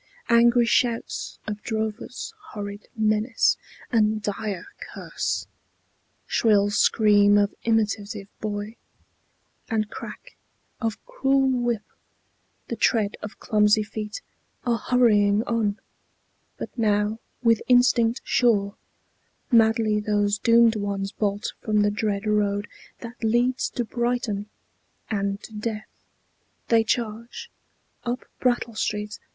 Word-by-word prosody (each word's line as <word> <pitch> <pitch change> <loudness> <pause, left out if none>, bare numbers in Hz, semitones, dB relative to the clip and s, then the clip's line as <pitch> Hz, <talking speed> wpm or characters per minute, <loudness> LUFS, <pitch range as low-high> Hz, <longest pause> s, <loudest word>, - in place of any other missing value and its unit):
Angry 235 +1 +5
shouts 235 0 0
Of 210 -1 -5
drovers, 220 - -4 0.2
horrid 205 0 -6
menace, 215 +2 +2 0.4
and 215 -2 +3
dire 205 -2 -4 0.3
curse, - - -3 0.8
Shrill 205 -2 +3
scream 205 -1 +4
of 205 0 +2
imitative 210 -2 0
boy, 210 +1 -4 0.9
and 215 -2 -1
crack - - -9 0.4
Of 225 -3 -3
cruel 275 - +2
whip, 240 -4 0 0.8
the - - -3
tread 215 -4 +1
of 210 - -8
clumsy 210 -1 +3
feet 210 0 -6 0.4
Are 235 -2 +1
hurrying 215 -4 +3
on: 225 -4 0 0.8
but - - -7
now, 210 -1 +1 0.2
with 230 -2 +4
instinct 245 -1 +4
sure, 205 -5 +2 0.8
Madly 225 -2 +4
those 205 0 +1
doomed 230 -1 +5
ones 200 -1 -2
bolt 205 0 -2
from 210 -1 +2
the 205 - +2
dread 205 -1 -2
road 205 -1 +1 0.3
That 235 0 -9
leads 240 +3 +2
to 240 - -3
Brighton 235 -3 -2 0.6
and 200 -1 -1
to 225 - -11
death. 215 0 -4 0.8
They 230 -1 +5
charge 235 - -3 0.5
Up 245 0 -3
Brattle 240 -2 +1
Street. 210 -1 -3
215 Hz, 110 wpm, -25 LUFS, 205-235 Hz, 0.9 s, Angry